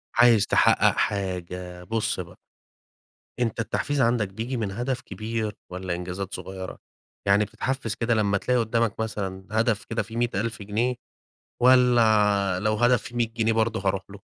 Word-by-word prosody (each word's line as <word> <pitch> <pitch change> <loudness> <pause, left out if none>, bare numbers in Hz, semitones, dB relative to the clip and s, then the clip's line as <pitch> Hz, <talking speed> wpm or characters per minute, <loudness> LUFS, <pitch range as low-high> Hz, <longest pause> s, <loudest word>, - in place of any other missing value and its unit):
عايز 115 -4 +6
تحقَّق - - +4
حاجة، 90 -2 -3
بُص 110 +3 -1
بقى. - - -7 1.0
أنت 115 -2 -1
التحفيز 140 +5 -1
عندك 115 -3 +2
بييجي 115 +6 -4
من 105 -4 -2
هدف 125 +4 -2
كبير 110 -1 -4 0.2
والّا 90 -1 -4
إنجازات 90 +3 -5
صغيرة؟ 95 -2 -6 0.5
يعني 100 +2 +4
بتتحفِّز 130 -4 -3
كده 115 0 0
لمّا 100 -2 +2
تلاقي 125 +4 +1
قُدّامك 115 -1 0
مثلًا 95 -4 -4
هدف 115 +1 +1
كده 115 - -2
فيه 115 0 -8
100.000 115 -2 -1
جنيه، 115 +5 -1 0.7
والّا 110 -7 +4
لو 110 +1 +1
هدف 120 +2 +3
فيه 120 - -9
100 120 -1 +1
جنيه 115 -1 +1
برضه 110 -1 +1
هاروح 95 -1 -1
له؟ 100 -1 -12
110 Hz, 150 wpm, -25 LUFS, 100-115 Hz, 1.0 s, عايز